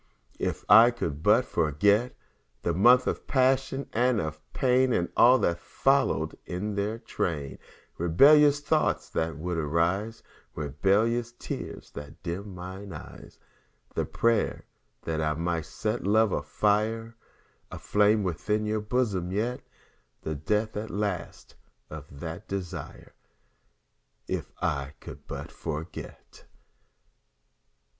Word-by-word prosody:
If - - -3
I 115 +2 +9
could 80 -12 -4
but - - +4
forget 100 - +2 0.5
The 85 - 0
months 120 +8 +6
of - - -3
passion 135 +1 +1
and 120 0 +2
of 80 -2 -4
pain, 130 -1 +2
And 85 -4 0
all 125 +2 +7
that 85 -7 0
followed - - +1
in 100 +4 -4
their 100 +2 -2
train 75 -10 -3 0.4
Rebellious 145 - +6
thoughts 155 +2 0
that 80 -2 -2
would 85 +1 -3
arise, 85 +9 0 0.3
Rebellious 100 - +1
tears - - -7
that 75 +4 -10
dimmed 90 +4 -4
mine 95 +1 -8
eyes, - - -11 0.6
The - - -1
prayers 115 -2 0 0.4
that 80 -1 -2
I 75 -1 0
might 85 -1 -2
set 110 +7 -3
love's 100 -7 +2
fire 110 +7 0 0.5
Aflame 105 +1 +2
within 105 +5 -1
your 105 0 -1
bosom 105 -6 -1
yet 115 +6 -1 0.6
The 80 - -2
death 105 +9 -1
at 105 +1 -4
last 100 -3 -4 0.4
of 70 -2 -10
that 80 0 -6
desire 95 -3 -6 1.1
If - - -4
I 70 -3 -1
could - - -11
but - - -7
forget. 80 +2 -8
100 Hz, 120 wpm, -27 LUFS, 80-115 Hz, 1.1 s, I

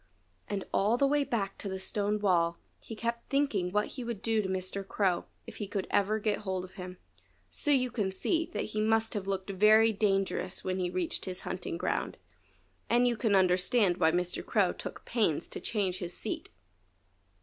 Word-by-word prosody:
And 200 -2 -2
all 215 +5 +3
the 275 - +3
way 290 +1 +3
back 220 -8 -2
to 200 - -4
the 190 - -3
stone 205 +2 -1
wall 170 -4 +2 0.2
he 225 - -8
kept 235 +1 -3
thinking 250 -11 +1
what 210 +2 +2
he 255 - -6
would 235 -3 -5
do 225 -1 +2
to 190 - -3
Mr. 190 +1 -2
Crow 190 -4 +1 0.2
if - - -10
he 205 - -4
could 195 -2 -2
ever 205 +2 +2
get 215 -1 0
hold 190 -3 -3
of 185 - -14
him. 180 -1 -8 0.5
So 295 - -3
you 255 -3 +3
can 200 -5 -1
see 325 - 0
that 210 - -2
he 215 - 0
must 220 +1 +2
have 200 -2 -3
looked 195 0 -2
very 215 +3 +6
dangerous 195 -2 0
when 185 0 -1
he 180 -1 0
reached 180 -1 -2
his 185 -1 -4
hunting 180 -2 -4
ground; - - -2 0.7
and 245 +1 +4
you 240 - +2
can 215 -2 +2
understand 185 +1 +3
why 160 -2 +4
Mr. 180 +1 -1
Crow - - +2
took - - -8
pains 210 -11 +1
to - - -5
change 190 -4 -1
his 175 0 -5
seat. - - -4
200 Hz, 195 wpm, -30 LUFS, 185-225 Hz, 0.7 s, very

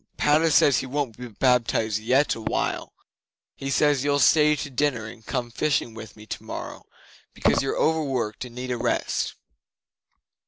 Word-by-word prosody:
Padda 155 +2 +3
says 145 -2 +5
he - - -5
won't 135 -4 -2
be 125 +2 -8
baptized 115 -2 +1
yet 130 +6 +2
awhile. 115 - -2 0.6
He 135 - -5
says 145 -1 +2
you'll 145 0 +2
stay 150 +1 +5
to 145 -1 -6
dinner 125 -4 0
and 110 +1 -11
come 120 0 -3
fishing 140 -2 0
with 110 -2 -10
me 105 - -12
tomorrow, - - -7 0.5
because - - +2
you're 135 - -2
over 160 0 +2
worked 125 -7 -2
and 120 -2 -10
need 125 0 -5
a 125 - -1
rest." - - -1
130 Hz, 160 wpm, -25 LUFS, 115-145 Hz, 0.6 s, says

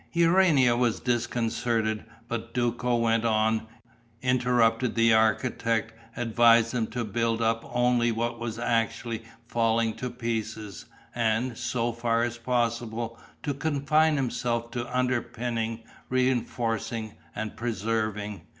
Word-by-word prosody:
Urania 165 -7 +4
was 120 -2 +1
disconcerted, 115 -2 0 0.2
but 115 0 -5
Duco 120 0 +1
went 115 -1 +2
on, 110 0 +1 0.6
interrupted 125 -2 +2
the 115 -1 +5
architect, 110 +1 +1 0.2
advised 115 -1 +4
him 115 -3 0
to 120 0 -3
build 115 +1 0
up 115 0 +1
only 120 -1 +2
what 115 +1 -2
was 115 -1 -4
actually 115 -1 -1 0.3
falling 115 -1 +1
to 125 - -3
pieces, 110 -5 -4 0.3
and, 115 +1 0
so 120 0 -1
far 115 0 0
as 120 0 -3
possible, 115 -1 -1 0.2
to 145 - -1
confine 155 +2 +2
himself 120 -3 -1
to 120 0 -4
underpinning, 120 -2 -1 0.3
reinforcing 115 -3 -1 0.2
and 110 0 -4
preserving. 110 -3 -2
115 Hz, 115 wpm, -27 LUFS, 115-120 Hz, 0.6 s, the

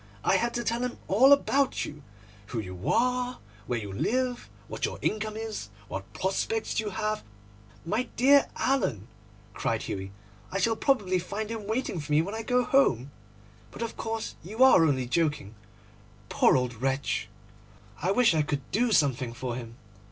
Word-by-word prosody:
I - - +4
had 235 0 -1
to 240 - -1
tell 235 +1 -1
him 250 0 -3
all 250 +8 +6
about 280 -1 +3
you—who 105 -4 -10
you 95 +2 -6
are, 250 +4 +1 0.3
where 120 - 0
you 100 -3 -5
live, 250 - -1 0.2
what - - -7
your - - -1
income 215 0 -1
is, 220 - -5 0.2
what 95 0 -6
prospects 215 +5 -1
you 215 -1 -1
have—' 215 +2 -2 0.6
'My 220 +8 -1
dear 280 +3 +5
Alan,' 135 - 0 0.5
cried - - -1
Hughie, 95 0 -5 0.4
'I 195 - -1
shall 225 +4 +2
probably 205 -9 +1
find 210 +5 -4
him 220 -3 -5
waiting 220 -5 -1
for 150 0 -7
me 150 +2 +4
when 200 +4 -5
I 225 - -3
go 250 +2 +2
home. 140 - +2 0.6
But - - -6
of 230 - -5
course 225 -1 -4
you 215 +9 +1
are 260 -10 +7
only 130 -4 +1
joking. 145 -5 0 0.8
Poor - - +4
old 125 -1 -1
wretch! 135 +1 -1 0.7
I 180 - 0
wish 230 0 +4
I 155 - +3
could 145 -2 -2
do 235 +4 +2
something 135 - +2
for 120 0 -4
him. 120 -1 -8
195 Hz, 165 wpm, -28 LUFS, -, 0.8 s, are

